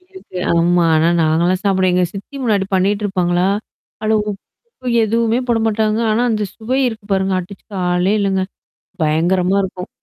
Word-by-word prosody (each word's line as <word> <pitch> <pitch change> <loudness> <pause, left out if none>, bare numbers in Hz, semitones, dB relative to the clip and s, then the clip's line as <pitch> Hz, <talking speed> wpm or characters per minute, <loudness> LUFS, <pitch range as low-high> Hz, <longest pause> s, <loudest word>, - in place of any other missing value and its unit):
அப்டி 365 +1 -32
இருக்கு, 185 - -9
ஆமா. 170 +1 +3
ஆனா 160 +2 +3
நாங்கலாம் 170 +4 +2
சாப்பிடுவேன். 190 -2 +2
எங்க 180 0 +3
சித்தி 200 +8 -8
முன்னாடி 205 -5 +1
பண்ணிட்டுருப்பாங்களா? 190 -2 +1 0.5
அதுல 220 0 +2
உப்பு 255 - -13 0.2
எதுவுமே 230 +2 +1
போடமாட்டாங்க. 220 -1 +1
ஆனா 235 +3 +1
அந்த 215 -1 0
சுவை 255 +4 -1
இருக்கு 220 -3 -8
பாருங்க. 190 0 +1
அடிச்சு 190 +2 -11
காலே 180 +2 +1
இல்லங்க. 190 -1 +1 0.6
பயங்கரமா 175 +5 +2
இருக்கும். 185 -1 -5
195 Hz, 145 wpm, -18 LUFS, 180-220 Hz, 0.6 s, ஆமா